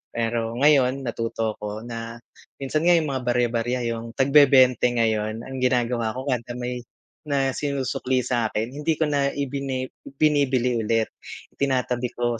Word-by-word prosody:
Pero 115 0 -1
ngayon 135 -1 +3
natuto 115 -2 -3
ako 105 +1 -5
na 115 -1 -6 0.4
minsan 140 +2 -2
nga 175 - +7
yung 155 -4 +1
mga 135 - -1
barya-barya 120 0 0
yung 115 0 -6
tagbebente 135 -3 +5
ngayon, 110 -1 0
ang 135 +1 -6
ginagawa 120 -3 0
ko 130 - -4
kada 120 -1 -3
may 125 0 -4 0.5
na 135 -2 +1
sinusukli 130 -2 -1
sa'kin 115 -1 -1
hindi 150 +3 -1
ko 160 - 0
na 140 -1 +2
ibini 135 -2 -3 0.2
binibili 135 -5 +2
ulit, 115 0 0 0.4
itinatabi 125 -3 -1
ko. 120 -1 -1
125 Hz, 140 wpm, -24 LUFS, 115-135 Hz, 0.5 s, nga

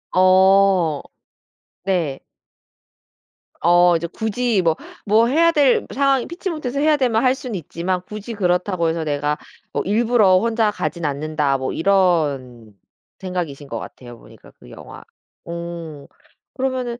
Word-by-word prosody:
어. 185 -3 +4 0.8
네. 175 -8 -1 1.4
어 175 +1 +5
이제 170 +1 -2
굳이 220 +2 -1
뭐 165 -2 +2 0.3
뭐 220 +3 +4
'해야 330 +6 +4
될 290 -5 +2
상황이 275 -1 +1
피치 355 +3 -5
못해서 280 -5 -4
해야 305 +1 +3
되면 240 -4 +1
할 255 - +4
수는 255 -4 -6
있지만 180 +2 -3
굳이 215 +3 -7
그렇다고 180 -3 0
해서 165 0 -2
내가 145 0 -1 0.4
뭐 - - 0
일부러 215 -2 +3
혼자 225 0 +1
가진 170 -4 -4
않는다.' 145 -1 -1
뭐 130 0 -3
이런 145 - 0 0.4
생각이신 175 -7 -5
것 - - -5
같아요, 120 -2 -11
보니까 - - -17
그 - - -16
영화. - - -12 0.4
오. 170 -4 -7 0.5
그러면은 255 -2 -2
185 Hz, 260 characters per minute, -20 LUFS, 160-235 Hz, 1.4 s, 어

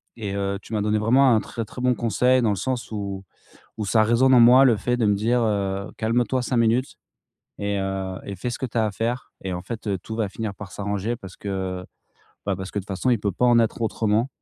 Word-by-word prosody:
et 105 -4 -4
heu, 100 0 -1
tu - - -11
m'as 105 - 0
donné 105 +1 +1
vraiment 125 +3 +4
un 110 - +2
très 115 - -5
très 125 - -9
bon 125 0 +3
conseil 125 +3 +2
dans 115 - +2
le - - 0
sens 125 +5 -3
où 100 -2 -4 0.5
où 110 - -3
ça 110 +4 +4
résonne 120 +4 +4
en 125 - +7
moi 125 +3 +8
le 120 -4 +5
fait 125 +4 -1
de 115 -3 +1
me 105 - +3
dire, 115 +5 +1
heu: 100 -3 -1
«Calme-toi 120 +3 0
5 125 +1 -1
minutes 120 +4 +1 0.6
et 100 0 -1
heu, 95 -1 -3
et 100 - -5
fais 120 - -3
ce 120 - -4
que - - -1
tu 120 - -5
as 110 - +3
à 105 - -1
faire 115 +4 -3
et 95 - -3
en 90 - -4
fait, 110 +3 -7
heu, 100 -2 0
tout 110 +5 -7
va 110 -3 -1
finir 105 0 -5
par 100 -1 -9
s'arranger 100 +3 -2
parce 95 -3 -11
que, 95 -2 -4 0.6
bah, 100 -2 0
parce 95 +1 -6
que - - -2
de - - -13
toute - - -26
façon 100 +6 0
il 120 - +3
peut 100 -1 -1
pas 125 +7 +1
en 120 -1 +5
être 115 +1 0
autrement» 110 +1 +1
110 Hz, 260 wpm, -24 LUFS, 100-120 Hz, 0.6 s, moi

